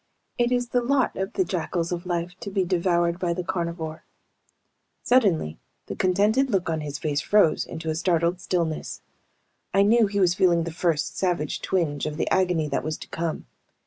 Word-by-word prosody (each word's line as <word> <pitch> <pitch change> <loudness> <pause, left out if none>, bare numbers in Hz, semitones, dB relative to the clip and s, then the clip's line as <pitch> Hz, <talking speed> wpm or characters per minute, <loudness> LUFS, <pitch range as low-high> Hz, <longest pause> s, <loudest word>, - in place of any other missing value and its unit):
It 240 0 +2
is 245 -1 0
the 245 - +1
lot 260 +1 +1
of 190 +1 -3
the 375 - +1
jackals 170 - -2
of 175 0 -4
life 175 0 -2
to - - -6
be 195 -1 0
devoured 175 -1 +1
by 175 -2 0
the 180 - -3
carnivore. 170 -2 -4 1.0
Suddenly 190 - +2 0.3
the - - -6
contented 210 +8 +2
look 190 -6 0
on 160 -1 -1
his 145 -1 -5
face 150 -1 -1
froze 205 -6 +3
into 160 0 -7
a - - 0
startled 170 +1 +1
stillness. 170 -3 -2 0.7
I 195 - +6
knew 225 +1 +4
he 200 0 -2
was 180 -3 +4
feeling 175 -2 +3
the 170 - -4
first 165 -1 -1
savage 175 -5 -1
twinge 155 -6 -1
of 150 0 -5
the - - -1
agony 180 -4 +2
that 140 - -1
was 155 0 -3
to - - -10
come. 165 -1 -3
175 Hz, 185 wpm, -25 LUFS, 165-195 Hz, 1.0 s, I